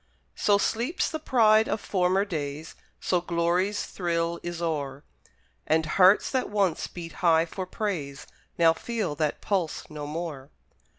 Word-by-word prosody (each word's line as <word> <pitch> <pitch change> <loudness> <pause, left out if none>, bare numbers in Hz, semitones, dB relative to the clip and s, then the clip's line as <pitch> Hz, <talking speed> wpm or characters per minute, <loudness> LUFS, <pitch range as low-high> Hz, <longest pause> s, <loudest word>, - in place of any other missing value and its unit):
So 205 -1 +3
sleeps 240 - -1
the 315 - -3
pride 220 -6 +4
of 215 - 0
former 190 0 +1
days, 155 -4 -5 0.3
So 180 -2 0
glory's 175 +4 0
thrill 170 -1 -2
is 175 -1 -5
o'er, 145 -5 -3 0.6
And 160 +1 +2
hearts 185 +5 +4
that 260 -1 0
once 200 -5 0
beat 170 -2 -8
high 165 -2 +4
for 185 +2 -6
praise, 170 -10 -4 0.3
Now 165 -1 +5
feel 215 -3 -3
that 150 -1 -1
pulse 180 -6 -2
no 150 -1 -6
more. 150 -3 -5
175 Hz, 140 wpm, -27 LUFS, 160-200 Hz, 0.6 s, Now